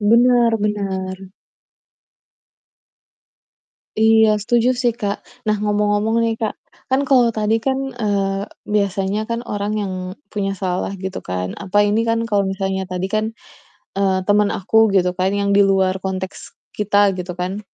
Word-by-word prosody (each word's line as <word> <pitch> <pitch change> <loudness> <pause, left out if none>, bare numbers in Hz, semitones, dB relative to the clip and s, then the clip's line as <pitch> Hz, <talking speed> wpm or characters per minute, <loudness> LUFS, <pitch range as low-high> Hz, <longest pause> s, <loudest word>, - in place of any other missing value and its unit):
Bener 235 +2 +4
bener. 190 -2 -3 2.7
Iya 220 -1 +5
setuju 235 +3 +2
sih, 245 -1 +1
Kak. 205 -2 -3 0.2
Nah, 215 0 +1
ngomong-ngomong 210 +1 +1
nih, 225 0 +1
Kak, 220 -2 -2 0.3
kan 265 +1 +2
kalau 250 -3 +5
tadi 220 0 0
kan, 265 +3 0
eee, 200 -3 -1 0.2
biasanya 200 -1 0
kan 230 +1 -3
orang 205 -2 -3
yang 200 -3 -2 0.4
punya 195 -2 -2
salah 185 -1 -2
gitu 190 0 -5
kan. 90 0 -4
Apa 205 +1 +2
ini 210 +2 +2
kan 230 0 +1
kalau 205 -4 +1
misalnya 190 -1 -2
tadi 180 0 -3
kan, 215 0 +1 0.8
eee, 190 -1 +2
temen 205 +1 +3
aku 220 +4 +3
gitu 180 -1 +3
kan 185 +1 +2
yang 200 0 0
di 200 - +4
luar 190 -1 +2
konteks 190 0 -5 0.2
kita 205 -1 +2
gitu 180 -1 -5
kan. 185 +3 -3
205 Hz, 140 wpm, -20 LUFS, 190-220 Hz, 2.7 s, Iya